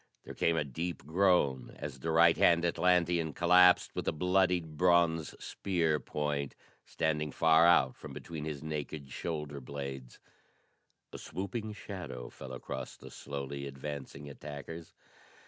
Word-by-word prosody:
There - - -8
came 85 -1 +1
a - - +2
deep 80 +4 -5
groan 80 -6 +2
as 70 -2 -6
the 80 - -3
right 85 +1 +6
hand 85 0 +4
Atlantean 85 -2 +2
collapsed 90 +3 +5
with - - -4
a - - +3
bloodied 90 -1 +1
bronze 85 -2 +3
spear 80 -5 0
point 70 0 -3 0.3
standing 75 -1 -1
far 80 +3 +5
out 65 -7 +4
from - - -10
between 80 -3 -7
his 75 -2 -5
naked 75 -2 -5
shoulder 75 -2 -4
blades. 65 -1 -7 1.0
A - - -7
swooping 100 +5 -5
shadow 85 - -7
fell 65 -1 -10
across 65 - -6
the - - -12
slowly 70 0 -5
advancing 70 +1 -7
attackers. 75 +3 -9
80 Hz, 135 wpm, -32 LUFS, 70-85 Hz, 1.0 s, right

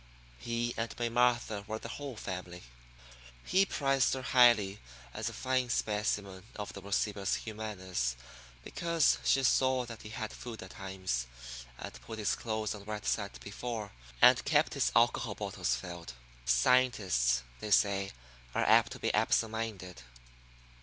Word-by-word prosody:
He 120 - -2
and 115 0 -3
May 120 -1 0
Martha 120 -3 +2
were 110 +1 -3
the 115 - -8
whole 140 -3 -5
family. 90 -4 -6 0.8
He 195 +1 +3
prized 135 -5 +2
her 130 - -5
highly 120 -6 +5 0.3
as - - -2
a - - -8
fine 130 -1 0
specimen 105 -4 -1
of 105 -1 -6
the 100 - -8
racibus 100 0 0
humanus 95 - -3 0.5
because 170 - +2
she 135 - +3
saw 130 0 +3
that 115 -2 -9
he 105 - -9
had 110 -1 -5
food 115 -4 -8
at 95 - -11
times, 95 - -3 0.5
and - - -8
put 85 - -8
his 105 -2 +1
clothes 110 -2 -2
on 100 -1 -10
right 105 0 -5
side 100 -2 -1
before, 110 0 -5 0.3
and - - +8
kept - - +2
his - - +1
alcohol - - +3
bottles - - -1
filled. 85 0 -7 0.3
Scientists, 65 - +3 0.2
they 105 - -5
say, 100 -1 +3 0.4
are - - +2
apt - - +5
to - - -10
be - - 0
absent 60 - +2
minded. 100 - -5
105 Hz, 150 wpm, -32 LUFS, 95-120 Hz, 0.8 s, and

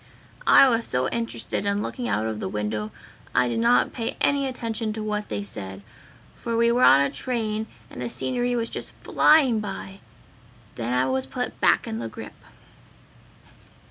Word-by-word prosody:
"I 275 - +8
was 230 -2 +1
so 125 +1 0
interested 230 -3 -2
in 200 +1 0
looking 245 -1 -4
out 110 - 0
of 110 -1 -3
the - - -3
window 105 +1 -3 0.5
I 125 0 +4
did 120 - -1
not 235 +1 +3
pay 230 -2 -4
any 280 -1 +2
attention 230 -3 -3
to 215 0 -5
what 210 0 -3
they 100 -1 -3
said, 100 -1 -7 0.5
for 230 -1 -3
we 235 0 +4
were 245 +1 +2
on 135 - +7
a 140 -1 +1
train 220 - -2 0.2
and - - -9
the 120 - -3
scenery 245 - 0
was 230 -1 -2
just - - -6
flying 270 -8 +4
by! 195 -1 -6 0.7
Then 120 0 -4
I 125 +1 +2
was 130 0 -1
put - - -4
back - - +4
in 110 - -4
the 115 -1 -4
grip. - - -9
210 Hz, 175 wpm, -25 LUFS, -, 0.7 s, I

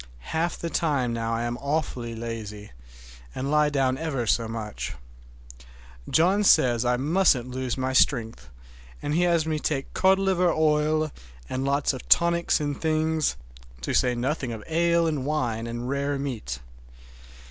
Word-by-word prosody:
Half 170 +2 0
the 170 - -5
time 140 -8 0
now 115 0 -2
I 115 - -2
am 120 +1 -3
awfully 140 -5 -2
lazy, 110 -2 -6 0.6
and 135 +2 -3
lie 150 0 +4
down 135 -2 0
ever 145 -7 -2
so 115 +1 +1
much. 110 -7 -5 1.1
John 190 +6 +3
says 120 - +4
I 125 0 +1
musn't 140 -4 +2
lose 130 -1 -3
my 130 0 -1
strength, 115 - +1 0.5
and 150 - -1
has 170 -3 +2
me 155 -1 -1
take 140 -3 -2
cod 190 0 +4
liver 185 -2 +2
oil 155 0 +1 0.4
and 130 +1 -3
lots 140 +1 +1
of 130 - -9
tonics 170 0 +4
and 145 -2 -3
things, 160 -1 +1 0.4
to - - -3
say 125 -1 +2
nothing 130 +1 -2
of 110 -2 -6
ale 170 +1 +2
and 150 -5 -1
wine 120 -6 -1
and 120 +1 -5
rare 140 +1 -1
meat. 115 - -4
140 Hz, 150 wpm, -25 LUFS, 120-160 Hz, 1.1 s, lie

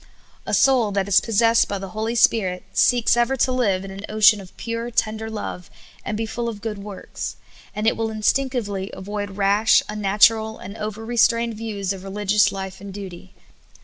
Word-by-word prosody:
A - - -3
soul 250 -6 +3
that 195 -1 0
is 200 - +5
possessed 230 +1 +3
by 200 - -3
the 195 0 -7
Holy 220 +3 -3
Spirit 190 -6 +2
seeks 240 -2 +3
ever 240 +3 +1
to 255 - +2
live 200 -7 0
in 195 - -8
an 195 +1 -9
ocean 215 -1 +5
of 185 -1 -15
pure, 230 0 -4
tender 220 -1 -1
love, 205 -5 -6 0.3
and 210 - -3
be 225 - -2
full 235 +1 -3
of 215 -3 -7
good 210 -2 -4
works; 200 -1 -7 0.4
and 210 - -2
it 225 - +3
will 225 0 -2
instinctively 215 -3 -1
avoid 205 0 -6
rash, 205 +2 +4
unnatural, 215 +2 +2
and 200 +3 -9
over 220 +2 -5
strained 230 0 +3
view^s 205 -3 -3
of 190 -1 -9
religious 200 +1 +2
life 190 -1 -7
and 200 0 -8
duty. 185 - -9
210 Hz, 180 wpm, -22 LUFS, 195-225 Hz, 0.4 s, is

